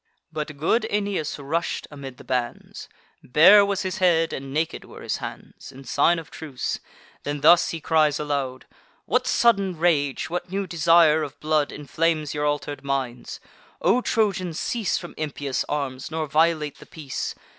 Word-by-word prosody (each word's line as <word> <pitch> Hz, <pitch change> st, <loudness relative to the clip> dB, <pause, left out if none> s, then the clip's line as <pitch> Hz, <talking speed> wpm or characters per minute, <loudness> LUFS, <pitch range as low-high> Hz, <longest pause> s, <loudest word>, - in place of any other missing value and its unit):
But 155 Hz, -1 st, -5 dB
good 165 Hz, +11 st, +1 dB
Aeneas 200 Hz, -7 st, -1 dB
rush'd 155 Hz, +4 st, -2 dB
amid 135 Hz, -3 st, -9 dB
the -, -, -13 dB
bands; 125 Hz, -2 st, -4 dB, 0.3 s
Bare 170 Hz, +10 st, +7 dB
was 200 Hz, -1 st, -1 dB
his 185 Hz, -1 st, -3 dB
head, 165 Hz, -3 st, +3 dB
and 135 Hz, 0 st, -6 dB
naked 155 Hz, +3 st, -2 dB
were -, -, -12 dB
his -, -, -2 dB
hands, -, -, -9 dB
In 135 Hz, 0 st, -12 dB
sign 145 Hz, +7 st, +2 dB
of 165 Hz, -2 st, -8 dB
truce: 145 Hz, -6 st, -4 dB, 0.4 s
then 145 Hz, 0 st, -4 dB
thus 175 Hz, +3 st, +6 dB
he 165 Hz, -, -4 dB
cries 155 Hz, -2 st, +2 dB
aloud: 140 Hz, -3 st, -3 dB, 0.4 s
"What -, -, +1 dB
sudden 200 Hz, -7 st, +2 dB
rage, 150 Hz, -5 st, +1 dB
what 175 Hz, +1 st, -4 dB
new 195 Hz, +1 st, -2 dB
desire 165 Hz, -2 st, +4 dB
of 145 Hz, -2 st, -6 dB
blood, 155 Hz, -1 st, +1 dB
Inflames 155 Hz, +1 st, -1 dB
your 150 Hz, -1 st, -1 dB
alter'd 145 Hz, 0 st, -3 dB
minds? 135 Hz, -3 st, -3 dB, 0.4 s
O 250 Hz, -, +3 dB
Trojans, 195 Hz, -9 st, 0 dB
cease 230 Hz, -5 st, -1 dB
From 175 Hz, -, -8 dB
impious 145 Hz, -3 st, -2 dB
arms, 135 Hz, -3 st, -3 dB
nor 160 Hz, 0 st, -2 dB
violate 155 Hz, -1 st, +1 dB
the -, -, -14 dB
peace! 145 Hz, -5 st, -5 dB
155 Hz, 160 wpm, -24 LUFS, 140-175 Hz, 0.4 s, Bare